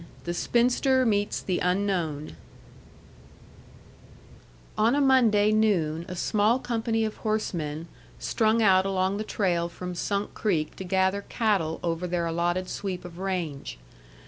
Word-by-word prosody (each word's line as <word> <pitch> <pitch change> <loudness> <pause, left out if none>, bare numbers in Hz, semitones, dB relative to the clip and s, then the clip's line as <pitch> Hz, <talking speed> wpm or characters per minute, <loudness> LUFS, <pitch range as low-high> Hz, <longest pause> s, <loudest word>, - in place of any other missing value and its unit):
THE 175 - -3
SPINSTER 250 +6 +2
MEETS 205 -2 0
THE 185 -2 -1
UNKNOWN 180 - -1 2.4
On 225 +5 +3
a - - +2
Monday 235 -7 +4
noon 175 -7 +1
a 180 - -6
small 215 +6 +2
company 225 -3 -1
of 215 - -5
horsemen 170 -8 -2 0.3
strung 225 0 +1
out 190 -1 +5
along 190 0 0
the 215 - -2
trail 175 -5 0
from 180 +1 -6
Sunk 200 +3 -2
Creek 165 -8 -1
to - - -5
gather 190 +2 +1
cattle 195 -9 0
over 170 +1 -1
their 175 -1 -1
allotted 175 +2 -1
sweep 185 -3 -4
of 175 0 -10
range. 175 - -3
190 Hz, 130 wpm, -26 LUFS, 175-215 Hz, 2.4 s, out